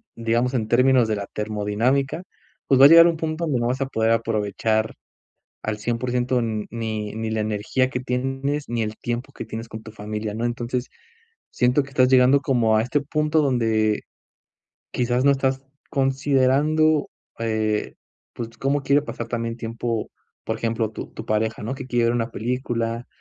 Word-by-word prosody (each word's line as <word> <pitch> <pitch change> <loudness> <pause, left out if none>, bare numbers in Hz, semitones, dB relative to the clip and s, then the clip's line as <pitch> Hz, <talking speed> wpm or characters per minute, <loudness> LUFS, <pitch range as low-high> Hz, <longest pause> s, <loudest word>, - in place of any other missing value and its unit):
Digamos, 115 +2 0
en 110 -4 -1
términos 125 -1 +4
de 110 - 0
la 100 -1 -5
termodinámica. 110 - -1 0.5
Pues, 135 -1 +4
va - - +11
a - - +12
llegar 165 +1 +9
un 170 - +1
punto 160 +1 -2
donde 135 -6 0
no 120 - +1
vas 130 +2 -1
a - - +2
poder 110 -3 0
aprovechar 110 0 0 0.7
al 105 0 -3
100% 120 +2 0
ni 110 -1 -3
ni 110 0 -3
la 110 - -1
energía 105 +5 0
que 125 - -2
tienes, 135 +3 -2
ni 120 -1 -1
el 110 0 -3
tiempo, 120 +4 -4
que 115 - -7
tienes 115 +1 -6
con 110 0 -8
tu 110 - -10
familia, 105 0 -5
¿no? 115 +2 -3
Entonces, 120 +1 -2 0.6
siento 125 +3 +2
que 140 - -12
estás 130 -1 +3
llegando 130 +2 +5
como 115 -5 +2
a 110 - +2
este 140 +4 0
punto, 150 +2 +1
donde 110 -5 +1 0.9
quizás 125 +1 0
no 140 - +6
estás 135 -1 0 0.3
considerando, 140 +3 +2 0.3
eh, 110 -2 -1 0.4
pues, 115 -1 -5
cómo 140 +1 0
quiere 140 +1 +3
pasar 115 -5 -6
también 115 -1 -3
tiempo, 115 -1 -3 0.3
por 110 - -2
ejemplo, 115 -1 -1
tu - - -7
tu 110 - -7
pareja, 110 0 -1
¿no? 120 +5 -3
Que 130 - -7
quiere 120 -2 +1
ver 115 - +2
una 115 -1 -1
película. 115 0 -2
120 Hz, 175 wpm, -23 LUFS, 110-135 Hz, 0.9 s, a